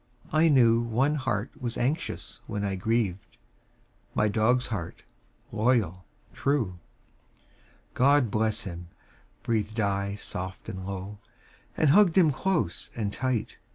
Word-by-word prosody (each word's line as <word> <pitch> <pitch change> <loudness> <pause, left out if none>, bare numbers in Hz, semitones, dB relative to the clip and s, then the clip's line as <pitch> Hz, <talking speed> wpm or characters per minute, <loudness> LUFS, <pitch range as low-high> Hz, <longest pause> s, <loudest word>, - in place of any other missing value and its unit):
I 155 +2 +5
knew 120 -6 +5
One 120 +5 +1
heart 125 -6 -2
was 120 -2 -3
anxious 145 +7 -2
when 100 0 -2
I 100 - -1
grieved 100 -1 -1 0.8
My 105 - +3
dog's 120 +4 +2
heart, 90 -7 -5 0.5
loyal, 105 -6 +1 0.3
true. 120 -11 0 1.1
"God 135 -3 +4
bless 110 +1 0
him," 90 -2 -7 0.6
breathed 110 -1 -1
I 100 -1 0
soft 95 -2 -6
and 95 0 -6
low, 100 +1 -6 0.6
And 155 -3 +4
hugged 195 0 +5
him 165 -5 +6
close 165 - -1
and 105 -3 -2
tight. 130 -2 -2
110 Hz, 120 wpm, -27 LUFS, 100-130 Hz, 1.1 s, him